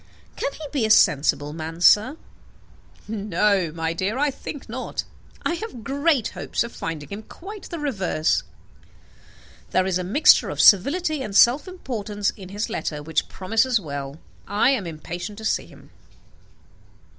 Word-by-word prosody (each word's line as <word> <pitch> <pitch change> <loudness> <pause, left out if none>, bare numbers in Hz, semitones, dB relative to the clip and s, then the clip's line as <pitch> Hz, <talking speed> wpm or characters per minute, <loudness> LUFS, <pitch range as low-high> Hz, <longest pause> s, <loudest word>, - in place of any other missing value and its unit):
Can - - -2
he 315 - -8
be 275 -6 0
a 220 - +1
sensible 145 -6 +3
man, 160 +1 -6
sir?" 215 - +5 0.9
"No, 200 -4 +1
my 165 0 -2
dear; 190 +7 -2
I 290 +1 +2
think 275 +1 -8
not. 250 +3 -4 0.4
I - - +1
have 340 - -6
great 280 -2 +1
hopes - - -2
of 235 - -7
finding 160 -3 -6
him 200 +2 -6
quite 395 - -10
the 340 - -5
reverse. 195 - 0 1.3
There 185 - +2
is 185 -1 0
a - - -2
mixture 255 - +5
of - - -5
servility 300 - +4
and 210 -6 -5
self 255 +9 +5
importance 215 - -3
in 190 -4 -12
his 205 +3 -3
letter 150 -2 -4
which 160 0 -1
promises 225 +5 +1
well. 140 -3 -6 0.3
I 205 +6 +3
am 220 -10 -1
impatient 175 +5 -6
to 220 - -8
see - - 0
him." - - -17
210 Hz, 155 wpm, -23 LUFS, 170-270 Hz, 1.3 s, sir